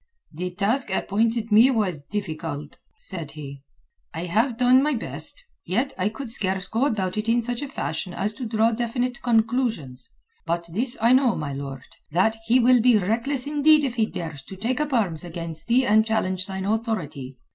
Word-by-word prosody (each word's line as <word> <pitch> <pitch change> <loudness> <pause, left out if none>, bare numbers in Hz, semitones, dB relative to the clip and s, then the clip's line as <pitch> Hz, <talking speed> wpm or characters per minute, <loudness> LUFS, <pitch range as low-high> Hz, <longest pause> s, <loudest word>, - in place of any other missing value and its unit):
"The 180 +4 -3
task 215 +6 0
appointed 225 +4 0
me 225 +5 +7
was 200 - 0
difficult," 155 -4 -5 0.2
said 165 -7 -5
he. 140 -3 -9 0.5
"I 165 +2 -3
have 225 +7 +1
done 250 +1 +5
my 295 0 +1
best. - - -5 0.2
Yet 235 +10 -1
I 190 +2 0
could 235 +2 +2
scarce 190 -4 +1
go 235 +6 +1
about 195 -7 -2
it 215 +2 -2
in 235 +1 +2
such 245 +2 -2
a 285 - -3
fashion 180 - -3
as 205 +4 -2
to 245 +1 -5
draw 225 +1 +2
definite 240 +2 -2
conclusions. 225 - 0 0.4
But 170 0 -1
this 245 +6 +1
I 230 +3 +4
know, 255 -2 +4
my 145 -2 -4
lord, 135 -1 -6 0.3
that 185 +8 +2
he 245 +3 +5
will 250 0 +5
be 240 -1 +5
reckless 235 +7 -1
indeed 300 +1 +4
if 265 -4 -1
he 225 -3 +1
dares 160 -8 -6
to 195 - -9
take 240 +8 -1
up 300 -1 -2
arms 190 - 0
against 165 -2 -7
thee 250 +2 +3
and 215 0 +5
challenge 190 -4 -1
thine 190 -1 -4
authority. 185 - -3
220 Hz, 185 wpm, -24 LUFS, 175-245 Hz, 0.5 s, me